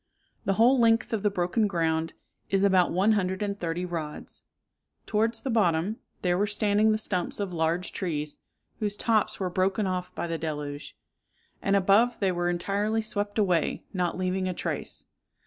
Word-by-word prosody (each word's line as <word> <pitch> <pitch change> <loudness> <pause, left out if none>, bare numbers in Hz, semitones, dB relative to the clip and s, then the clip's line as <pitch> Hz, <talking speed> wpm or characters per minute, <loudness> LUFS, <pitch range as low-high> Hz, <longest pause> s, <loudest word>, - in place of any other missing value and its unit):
The 195 - +2
whole 245 +6 +4
length 230 0 +3
of 220 - 0
the 210 - +2
broken 195 +3 +1
ground 165 -3 0 0.4
is 195 0 +2
about 190 -3 +4
one 195 +5 +3
hundred 190 -2 0
and 200 -1 -3
thirty 175 +1 -2
rods. 160 -4 -5 0.6
Towards 225 +2 +1
the 265 - -2
bottom 195 -1 +1 0.3
there 180 0 +2
were 205 - +2
standing 210 +1 +2
the 215 - +2
stumps 185 -4 0
of 200 -3 -3
large 165 +2 0
trees, 150 -5 -3 0.4
whose 210 -1 -1
tops 220 -2 +1
were 185 -2 -2
broken 190 +3 +1
off 185 -1 -2
by - - -2
the 165 -1 -3
deluge; 150 -2 -5 0.6
and 200 - +2
above 200 +5 +4
they 195 -2 +2
were 175 0 0
entirely 205 +5 0
swept 205 -1 -2
away, 180 -6 +1
not 180 -2 -1
leaving 185 0 -1
a 180 - -3
trace. - - -4
190 Hz, 170 wpm, -27 LUFS, 175-210 Hz, 0.6 s, whole